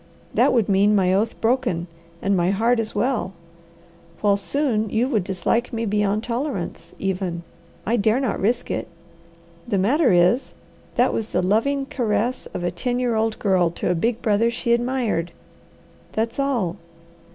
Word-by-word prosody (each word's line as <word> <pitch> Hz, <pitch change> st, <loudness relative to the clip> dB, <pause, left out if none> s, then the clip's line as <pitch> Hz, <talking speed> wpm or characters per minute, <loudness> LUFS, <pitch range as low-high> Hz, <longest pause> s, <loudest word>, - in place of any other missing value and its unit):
That -, -, +4 dB
would 230 Hz, -5 st, +2 dB
mean 205 Hz, +2 st, +4 dB
my 185 Hz, -2 st, +3 dB
oath 215 Hz, +4 st, 0 dB
broken, 225 Hz, -8 st, +1 dB, 0.4 s
and 200 Hz, 0 st, +2 dB
my 175 Hz, 0 st, +2 dB
heart 230 Hz, +5 st, +2 dB
as 225 Hz, -1 st, -3 dB
well; 225 Hz, -3 st, 0 dB, 0.9 s
while 205 Hz, -1 st, +4 dB
soon 220 Hz, +1 st, 0 dB
you 230 Hz, +5 st, +1 dB
would 225 Hz, -8 st, +1 dB
dislike 195 Hz, +6 st, -1 dB
me 230 Hz, 0 st, -2 dB
beyond 210 Hz, 0 st, 0 dB
tolerance, 240 Hz, -, -4 dB
even. 185 Hz, -3 st, -2 dB, 0.4 s
I 235 Hz, +4 st, +1 dB
dare 220 Hz, +3 st, +2 dB
not 260 Hz, -6 st, -1 dB
risk 230 Hz, +5 st, 0 dB
it! -, -, -2 dB, 0.8 s
The 200 Hz, -, 0 dB
matter 250 Hz, -, +3 dB
is, 180 Hz, +8 st, +3 dB, 0.4 s
that -, -, +3 dB
was 220 Hz, -, -2 dB
the -, -, -1 dB
loving 270 Hz, +9 st, +1 dB
caress 245 Hz, -2 st, -1 dB
of -, -, -6 dB
a 175 Hz, -, 0 dB
ten 245 Hz, +8 st, -2 dB
year 250 Hz, -2 st, 0 dB
old 220 Hz, 0 st, 0 dB
girl 185 Hz, -4 st, +2 dB
to 170 Hz, -, -2 dB
a -, -, +3 dB
big 225 Hz, +7 st, -1 dB
brother 220 Hz, +2 st, +3 dB
she 235 Hz, 0 st, 0 dB
admired. 235 Hz, -9 st, 0 dB, 0.8 s
That's 230 Hz, +4 st, -2 dB
all! 240 Hz, -11 st, 0 dB
220 Hz, 165 wpm, -22 LUFS, 195-240 Hz, 0.9 s, That